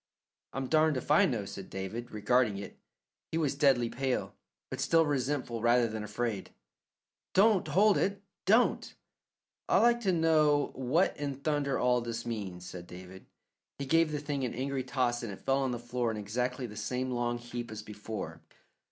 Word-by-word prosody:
"I'm 135 0 -2
darned 155 +1 +3
if 130 - -4
I 150 - +6
know," 110 -6 -2
said 95 -1 -8
David, 105 +5 -5
regarding 110 0 +2
it. 100 - -8 0.5
He 160 - -1
was 150 -4 +1
deadly 135 -4 +3
pale, 130 +2 -2 0.4
but - - -4
still 165 -1 +4
resentful 130 -4 -1
rather 120 +1 +4
than 110 -1 -4
afraid. 105 0 -3 0.9
"Don't 200 0 +5
hold 205 +2 +4
it; 200 0 -1 0.2
don't!" 225 +5 +3 0.7
"I'd - - +5
like 235 0 +4
to 195 -5 +2
know 155 -4 +3
what 135 +8 +1
in 145 -2 -3
thunder 145 -2 0
all 125 -1 +2
this 115 0 -4
means?" 100 -6 -5
said 90 -1 -8
David. 95 +1 -11 0.5
He 140 - -4
gave 165 +3 +3
the 150 - -1
thing 145 -2 -3
an 120 -2 -2
angry 135 +1 -2
toss 125 -2 0
and 115 -4 -5
it 95 - -11
fell 135 +1 +3
on 135 -2 0
the 120 - -2
floor 120 0 -2
in 110 - -3
exactly 125 +5 -2
the 105 -3 -8
same 130 +3 -2
long 120 -1 -1
heap 120 0 -6
as 110 -1 -7
before. 105 +1 -7
125 Hz, 180 wpm, -31 LUFS, 115-145 Hz, 0.9 s, I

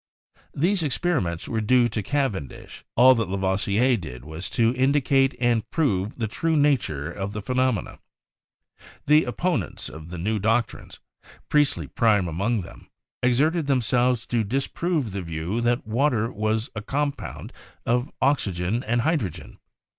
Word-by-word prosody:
These 180 +6 +2
experiments 140 - -1
were 110 -1 -1
due 120 +2 +4
to 110 0 -2
Cavendish; 105 - -3
all 130 +2 +7
that 115 -6 -1
Lavoisier 100 +6 +1
did 65 - -9
was 80 +4 -5
to 115 -1 +2
indicate 135 +1 +2
and 120 -3 +1
prove 110 - 0
the 115 -3 -1
true 160 +9 -1
nature 100 - +1
of 100 +2 -5
the 105 - -4
phenomena. 125 -4 -1 1.1
The 150 0 +5
opponents 125 - -2
of 80 +1 -10
the 90 - -6
new 105 +6 -1
doctrines, 115 +3 -1 0.5
Priestley 145 -2 +2
prime 105 -7 +2
among 100 +7 -1
them, 85 - -13 0.3
ex 125 -1 +3
erted 155 +2 +1
themselves 125 -2 +2
to 115 -2 0
disprove 135 - -1
the 100 0 -4
view 85 +6 -3
that 120 +1 0
water 115 0 +1
was 110 +3 -1
a 105 - -5
compound 140 +5 -4 0.3
of 120 +2 +1
oxygen 110 -6 0
and 120 +2 0
hydrogen. 105 - -2
115 Hz, 140 wpm, -24 LUFS, 100-135 Hz, 1.1 s, all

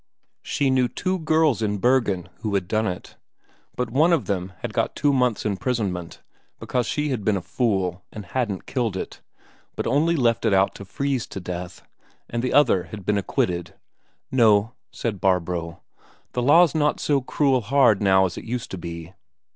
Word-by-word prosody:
She 140 -2 0
knew 130 -1 +3
two 185 +8 -2
girls 155 -6 +2
in 105 -1 0
Bergen 110 -6 +1
who 105 -2 -2
had 90 -3 -1
done 110 +2 0
it; 90 -1 -6 0.6
but 125 -2 -2
one 155 +7 +4
of 165 -4 +2
them 95 -2 -2
had - - -4
got - - -1
two 145 -1 +2
months' 125 -5 +1
imprisonment 100 -5 -2 0.4
because 125 -3 -1
she 150 0 -1
had 125 -6 -2
been 105 -1 +2
a - - -4
fool 95 -7 -1
and 105 -2 -8
hadn't 105 -1 -2
killed 115 -7 -2
it, - - -6 0.5
but - - -3
only 160 +5 +2
left 120 -6 +1
it 110 -4 +3
out 95 +1 +3
to 100 - -10
freeze 135 +4 -2
to - - -7
death; 90 -1 -6 0.4
and 120 - -3
the 125 - -1
other 130 -11 +4
had 105 -3 -9
been 105 0 +2
acquitted. 85 -3 -2 0.6
"No," 110 -3 +4 0.2
said 105 -5 -4
Barbro, 85 -3 -1 0.5
"the 125 - -2
law's 160 +6 +5
not 150 -2 +1
so 140 -2 +1
cruel 130 0 +1
hard 115 -2 +3
now 95 -1 +4
as 90 - -4
it - - -11
used 125 +1 -4
to 95 - -5
be. 85 +1 -7
110 Hz, 180 wpm, -23 LUFS, 95-130 Hz, 0.6 s, law's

